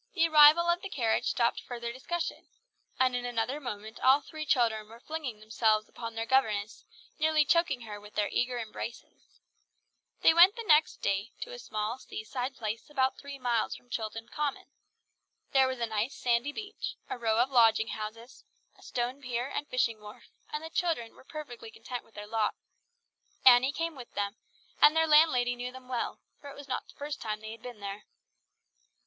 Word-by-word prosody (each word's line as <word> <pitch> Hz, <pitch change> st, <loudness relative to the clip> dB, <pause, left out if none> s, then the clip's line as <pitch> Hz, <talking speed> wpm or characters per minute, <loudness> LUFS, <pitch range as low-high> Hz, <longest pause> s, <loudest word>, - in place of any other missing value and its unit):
The 330 Hz, -3 st, +4 dB
arrival 310 Hz, +2 st, +8 dB
of 345 Hz, +1 st, +2 dB
the 395 Hz, -, -6 dB
carriage 230 Hz, -9 st, 0 dB
stopped 235 Hz, -2 st, +1 dB
further 235 Hz, -1 st, -5 dB
discussion, 335 Hz, +6 st, -4 dB, 0.5 s
and 255 Hz, -1 st, +3 dB
in 245 Hz, -, -2 dB
another 245 Hz, +3 st, -1 dB
moment 220 Hz, -5 st, -7 dB
all 265 Hz, +2 st, +6 dB
three 310 Hz, +2 st, -8 dB
children 220 Hz, -5 st, +2 dB
were 230 Hz, +1 st, -13 dB
flinging 280 Hz, -6 st, -5 dB
themselves 215 Hz, 0 st, +1 dB
upon 230 Hz, -1 st, -7 dB
their 225 Hz, 0 st, -2 dB
governess, 220 Hz, -5 st, +1 dB, 0.3 s
nearly 310 Hz, -1 st, +3 dB
choking 335 Hz, -6 st, +2 dB
her 210 Hz, -2 st, -8 dB
with 210 Hz, 0 st, -14 dB
their 205 Hz, -1 st, +1 dB
eager 250 Hz, 0 st, 0 dB
embraces. 230 Hz, +1 st, -8 dB, 0.8 s
They -, -, +7 dB
went 360 Hz, +5 st, +8 dB
the 465 Hz, -, -5 dB
next 305 Hz, -3 st, +4 dB
day 200 Hz, +4 st, -1 dB
to -, -, -5 dB
a -, -, -8 dB
small 215 Hz, -, -3 dB
seaside 250 Hz, +5 st, -5 dB
place 220 Hz, +1 st, -5 dB
about 265 Hz, -3 st, 0 dB
three 280 Hz, -1 st, -8 dB
miles 240 Hz, -4 st, 0 dB
from 245 Hz, -, -17 dB
Chilton 225 Hz, 0 st, -4 dB
Common. 295 Hz, +1 st, -3 dB, 0.9 s
There 265 Hz, -1 st, +5 dB
was 260 Hz, -1 st, -3 dB
a 235 Hz, -, +1 dB
nice 220 Hz, +3 st, -2 dB
sandy 240 Hz, +3 st, +1 dB
beach, 415 Hz, +5 st, -6 dB
a -, -, -5 dB
row 225 Hz, -2 st, +1 dB
of 250 Hz, +3 st, +2 dB
lodging 225 Hz, -3 st, +5 dB
houses, 225 Hz, +3 st, -7 dB, 0.3 s
a -, -, -22 dB
stone 245 Hz, +3 st, -3 dB
pier 245 Hz, 0 st, -3 dB
and 295 Hz, -, -2 dB
fishing 230 Hz, -3 st, 0 dB
wharf; 210 Hz, +3 st, -13 dB, 0.2 s
and 300 Hz, +1 st, -4 dB
the 320 Hz, -, -7 dB
children 315 Hz, -12 st, -1 dB
were -, -, -17 dB
perfectly 305 Hz, -, -8 dB
content 340 Hz, -, -7 dB
with 225 Hz, -, -26 dB
their 205 Hz, -, -7 dB
lot. 215 Hz, 0 st, 0 dB, 0.9 s
Annie 255 Hz, +1 st, +8 dB
came 330 Hz, +1 st, -3 dB
with 250 Hz, -3 st, -10 dB
them, 200 Hz, +1 st, -2 dB, 0.4 s
and 300 Hz, +1 st, +8 dB
their 320 Hz, 0 st, +4 dB
landlady 300 Hz, -6 st, +5 dB
knew 245 Hz, +1 st, -5 dB
them 260 Hz, 0 st, -12 dB
well, 250 Hz, -2 st, -3 dB, 0.2 s
for 285 Hz, -, -10 dB
it 280 Hz, -, -10 dB
was 285 Hz, -1 st, -10 dB
not 255 Hz, -, -3 dB
the -, -, -17 dB
first 290 Hz, 0 st, -6 dB
time 215 Hz, -1 st, -3 dB
they 220 Hz, 0 st, -7 dB
had 225 Hz, 0 st, -10 dB
been 240 Hz, -3 st, -9 dB
there. 200 Hz, +1 st, -6 dB
245 Hz, 190 wpm, -30 LUFS, 225-290 Hz, 0.9 s, arrival